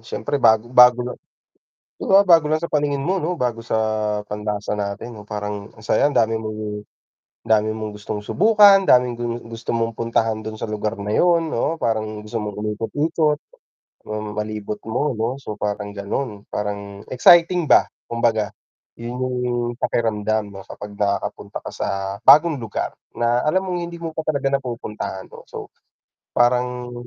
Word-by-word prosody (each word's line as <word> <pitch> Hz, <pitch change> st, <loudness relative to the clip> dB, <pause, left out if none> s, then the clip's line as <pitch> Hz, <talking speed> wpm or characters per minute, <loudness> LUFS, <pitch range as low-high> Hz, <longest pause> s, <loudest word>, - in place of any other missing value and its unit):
siyempre 115 Hz, +5 st, -3 dB
bago 110 Hz, 0 st, +5 dB
bago 125 Hz, -1 st, +7 dB
na. 125 Hz, -, -3 dB, 0.8 s
Di -, -, -9 dB
ba 195 Hz, +1 st, +6 dB
bago 165 Hz, -4 st, +6 dB
lang 155 Hz, -, +2 dB
sa 170 Hz, -, -3 dB
paningin 145 Hz, -2 st, 0 dB
mo 190 Hz, +4 st, 0 dB
'no 175 Hz, +2 st, -2 dB
bago 125 Hz, -6 st, -1 dB
sa 115 Hz, -, -2 dB, 0.5 s
panlasa 105 Hz, 0 st, -3 dB
natin 105 Hz, +3 st, -5 dB
parang 105 Hz, 0 st, -5 dB
ang 110 Hz, -, -15 dB
sayang 145 Hz, +6 st, +2 dB
dami 115 Hz, 0 st, +3 dB
mong 110 Hz, -1 st, -5 dB, 0.8 s
dami 110 Hz, -1 st, +2 dB
mong 110 Hz, -1 st, -5 dB
gustong 105 Hz, 0 st, -5 dB
subukan, 205 Hz, -, +6 dB
daming 125 Hz, -6 st, +4 dB, 0.3 s
gusto 115 Hz, 0 st, -5 dB
mong 115 Hz, -1 st, -1 dB
puntahan 115 Hz, -1 st, 0 dB
dun 110 Hz, 0 st, -5 dB
sa -, -, -3 dB
lugar 105 Hz, +1 st, -2 dB
na 105 Hz, +1 st, -3 dB
yun 170 Hz, +3 st, +3 dB
'no, 155 Hz, +7 st, 0 dB
parang 110 Hz, -2 st, -1 dB
gusto 105 Hz, +2 st, -6 dB
mong 105 Hz, -1 st, -5 dB
umikot-ikot, 150 Hz, +9 st, 0 dB, 0.7 s
hmm 105 Hz, -1 st, -5 dB
malibot 105 Hz, 0 st, -4 dB
mo 125 Hz, +6 st, 0 dB
'no 110 Hz, +1 st, -1 dB
so 120 Hz, -6 st, -6 dB
parang 105 Hz, 0 st, -2 dB
ganon. 105 Hz, +1 st, -4 dB
Parang 100 Hz, -1 st, -4 dB
exciting 170 Hz, +6 st, +5 dB
ba -, -, +7 dB, 0.3 s
kumbaga 115 Hz, -3 st, +1 dB, 0.5 s
yun 120 Hz, +1 st, -5 dB
yung 130 Hz, -1 st, -1 dB, 0.4 s
pakiramdam 110 Hz, -3 st, 0 dB
'no 95 Hz, -1 st, -9 dB
kapag 105 Hz, 0 st, -9 dB
nakakapunta 100 Hz, -1 st, -2 dB
ka -, -, -6 dB
sa -, -, -3 dB, 0.4 s
bagong 155 Hz, -1 st, +7 dB
lugar, 115 Hz, -4 st, -3 dB, 0.2 s
na 120 Hz, +1 st, +1 dB
alam 185 Hz, +5 st, +2 dB
mong 180 Hz, -, -1 dB
hindi 170 Hz, 0 st, -8 dB
mo 165 Hz, -, -3 dB
pa 160 Hz, -, -4 dB
talaga 140 Hz, -3 st, 0 dB
napupuntahan 115 Hz, -7 st, -4 dB
oh, -, -, -13 dB
so -, -, -8 dB, 0.7 s
parang 125 Hz, 0 st, +1 dB
115 Hz, 155 wpm, -21 LUFS, 105-140 Hz, 0.8 s, bago